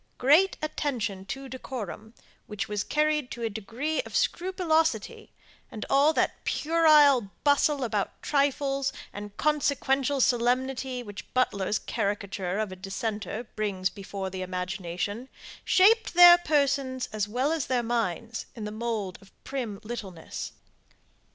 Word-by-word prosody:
Great 310 +9 +4
attention 235 -11 -2
to 270 +7 -6
decorum, 235 -4 -7 0.3
which 210 -2 -4
was 210 -1 -2
carried 300 -3 +1
to 235 - -6
a 225 - -1
degree 230 - -2
of - - -10
scrupulosity, 340 - 0 0.4
and 215 - -6
all 280 +3 +5
that - - -1
puerile 300 -8 +4
bustle 285 -1 +3
about 210 -4 -2
trifles 275 -1 +1 0.2
and 205 0 -8
consequential 280 -2 +1
solemnity, 255 +1 +1
which 205 -3 -10
Butler's 205 -5 +1
caricature 195 -2 -2
of 215 -2 -2
a - - -6
dissenter 210 +4 -4
brings 195 -3 -1
before 195 0 -6
the 185 0 -5
imagination, 185 +5 -4 0.3
shaped 415 +1 +4
their 350 0 +10
persons 280 -5 0
as 210 -1 -1
well 255 +7 0
as 320 -4 -1
their 250 -2 +1
minds 230 0 -2
in 225 - -7
the 210 - -4
mould 215 -4 -3
of 195 - -19
prim 240 -7 -4
littleness. 200 -7 -6
240 Hz, 130 wpm, -27 LUFS, 205-285 Hz, 0.4 s, their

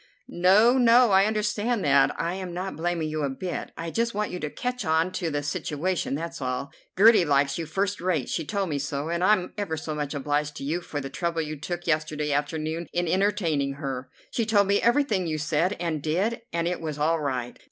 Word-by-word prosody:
"No, 210 +8 +4
no! 240 -1 +6
I 190 +1 +6
understand 215 0 0
that. 140 -1 +3
I 170 +1 -1
am 185 -2 -5
not 185 +2 -4
blaming 170 -1 -1
you 155 0 -3
a 140 - 0
bit. 175 +7 -4
I 165 0 -4
just 230 +1 -1
want 210 0 -1
you 180 - -4
to 150 - -3
catch 250 +7 -3
on 160 +1 +1
to 175 -2 -2
the 145 -1 -2
situation, 150 +2 -2
that's 165 0 -5
all. 130 +2 -3 0.3
Gertie 215 0 +7
likes 140 -1 +2
you 165 - -4
first 195 +4 -1
rate; 170 -8 0
she 165 - -2
told 195 +3 -2
me 145 -2 -1
so, 140 +2 -3
and 170 +1 -1
I'm 185 -2 +3
ever 170 -6 -2
so 155 0 -4
much 150 -1 -3
obliged 145 +1 -1
to - - -7
you 160 +6 -1
for 150 -4 -5
the 135 -1 -6
trouble 170 0 -1
you 155 0 -5
took 175 +4 -5
yesterday 155 -2 0
afternoon 155 +3 -2
in 175 0 -1
entertaining 170 -7 +1
her. 135 -3 -5 0.2
She 235 - 0
told 210 -2 +3
me 200 +1 +2
everything 235 -7 +2
you 155 -1 -1
said 155 +5 +1
and 165 -4 -2
did, 190 +11 0
and 170 0 -1
it 180 - -2
was 155 -2 -4
all 160 +2 +1
right. 130 -4 -3
165 Hz, 215 wpm, -26 LUFS, 150-195 Hz, 0.3 s, Gertie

